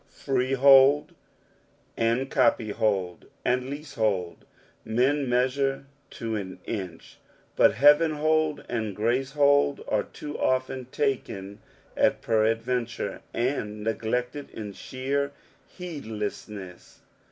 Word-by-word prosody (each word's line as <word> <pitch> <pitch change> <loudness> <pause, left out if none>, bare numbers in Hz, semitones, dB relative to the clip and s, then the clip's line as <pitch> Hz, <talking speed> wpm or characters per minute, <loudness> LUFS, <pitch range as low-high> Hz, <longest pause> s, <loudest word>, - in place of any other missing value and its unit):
Freehold 135 +2 +4 0.8
and 115 +4 0
copyhold, 110 - +1 0.2
and 125 +1 +1
leasehold, 110 - -2 0.4
men 130 +5 +1
measure 135 +2 +1 0.2
to 115 -2 -4
an 95 -3 -5
inch, 95 -7 -6 0.4
but - - +5
beavcnhold 155 +3 +3
and 110 -4 -3
gracehold 140 +5 +2
are 105 - +1
too 145 +7 -8
often 130 0 0
taken 110 -7 -3 0.4
at - - +2
peradventure, 115 +2 0
and 105 -4 -2
neglected 120 +5 -2
in 105 -2 -7
sheer 140 +5 -3 0.3
heedless 125 - -6
ness. 95 -4 -11
125 Hz, 90 wpm, -26 LUFS, 110-140 Hz, 0.8 s, but